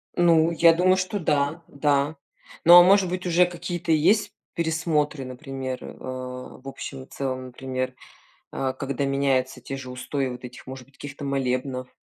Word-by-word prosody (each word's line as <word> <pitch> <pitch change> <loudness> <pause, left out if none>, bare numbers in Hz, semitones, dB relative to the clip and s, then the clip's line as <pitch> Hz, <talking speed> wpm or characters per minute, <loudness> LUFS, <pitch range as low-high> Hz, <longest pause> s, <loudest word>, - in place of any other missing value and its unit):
Ну, 170 -1 +4
я 165 0 +6
думаю, 185 +2 +3
что 185 +2 -2
да, 150 0 0
да. 145 +1 +1 0.5
Но, 175 +1 +10
а - - +9
может 190 0 +5
быть, 180 +1 -4
уже 175 +1 +5
какие-то 175 -1 -4
есть 195 +8 +3 0.2
пересмотры, 160 -4 -1
например, 130 0 -6
а, 125 0 -7
в 130 - -14
общем 135 0 -7
и - - -14
целом, 130 -1 -4
например, 130 0 -4 0.6
а, 130 -1 -1
когда 140 +1 -3
меняются 135 -2 0
те 135 - -6
же 130 -1 -8
устои 130 +2 -3
вот 125 0 -8
этих, 125 - -10
может 130 -1 -8
быть, 140 - -27
каких-то 145 +1 -8
молебнов, 130 -1 -2
140 Hz, 165 wpm, -25 LUFS, 130-165 Hz, 0.6 s, Но